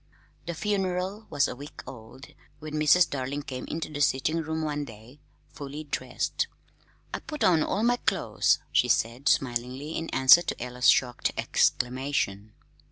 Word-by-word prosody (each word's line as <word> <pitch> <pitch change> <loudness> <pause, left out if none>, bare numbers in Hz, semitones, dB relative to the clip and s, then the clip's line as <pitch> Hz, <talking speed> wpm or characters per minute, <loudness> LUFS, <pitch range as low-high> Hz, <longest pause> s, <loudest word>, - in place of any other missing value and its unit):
The 170 - -3
"funeral" 195 +2 -2
was 140 - +2
a - - -5
week 145 +3 -10
old 130 +1 -12 0.2
when 155 0 -9
Mrs. 155 +3 +5
Darling 140 +1 -4
came 130 -2 -6
into 160 0 -4
the 145 - -3
sitting 150 +4 +1
room 160 0 -3
one 150 -1 -2
day, 115 +2 -13 0.3
fully 145 +2 -7
dressed. 145 - -2 0.7
"I - - -2
put 300 -2 -5
on 165 -3 +4
all 200 +7 0
my 245 +1 +3
clo's," - - +1
she - - +3
said 120 +5 +1
smilingly, 130 +3 -1
in 165 - -3
answer 130 +6 +7
to - - -4
Ella's 125 +1 +1
shocked 125 -2 +2
exclamation. 125 -5 0
145 Hz, 155 wpm, -27 LUFS, 125-160 Hz, 0.7 s, answer